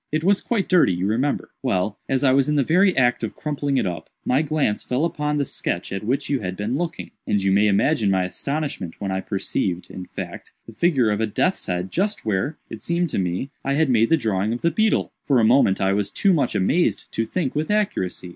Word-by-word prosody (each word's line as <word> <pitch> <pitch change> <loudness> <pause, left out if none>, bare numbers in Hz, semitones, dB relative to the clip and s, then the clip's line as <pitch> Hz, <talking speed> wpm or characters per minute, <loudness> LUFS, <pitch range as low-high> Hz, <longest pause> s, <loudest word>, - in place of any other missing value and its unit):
It 155 +1 0
was 195 +2 +3
quite 220 -5 -1
dirty, 175 - +4
you 90 +2 -2
remember. 125 +8 -1
Well, 105 -5 -1
as 135 0 +1
I 130 - +5
was 135 +1 +3
in 150 - +1
the 140 - +3
very 185 +7 +3
act 125 -2 +2
of 110 - -3
crumpling 145 -2 -2
it - - +1
up, 90 -2 -4 0.2
my 130 +3 +3
glance 150 -8 0
fell 130 +6 0
upon 150 -3 -1
the 140 - 0
sketch 90 -7 -3
at 95 - -4
which 125 +6 -1
you 140 -2 0
had 90 -3 -5
been 105 +5 -2
looking, 170 +2 -4 0.2
and 105 - +2
you 95 0 +1
may 100 +2 +4
imagine 105 +2 +2
my 95 -1 +2
astonishment 140 - -4
when 100 -2 -3
I 95 0 -1
perceived, 95 -2 -2
in 90 - -7
fact, - - -8
the 115 - -12
figure 130 -4 +2
of 105 +1 -1
a 110 - +1
death's 185 - 0
head 90 +1 -2
just 205 - -1
where, 110 +9 -1
it 110 - -9
seemed 170 +3 0
to - - -1
me, 90 +9 -2
I 135 - 0
had 145 -1 +2
made 115 -1 +3
the 165 - +4
drawing 110 -4 0
of 120 - -6
the 170 - +3
beetle. 220 +6 +1 0.2
For 135 -4 +4
a - - +3
moment 115 -4 +4
I 95 0 +2
was 100 0 0
too 195 -2 +2
much 140 -7 0
amazed 110 - +1
to 115 - -1
think 150 -1 -2
with 150 +4 -2
accuracy. 195 - -1
125 Hz, 240 wpm, -22 LUFS, 100-155 Hz, 0.2 s, I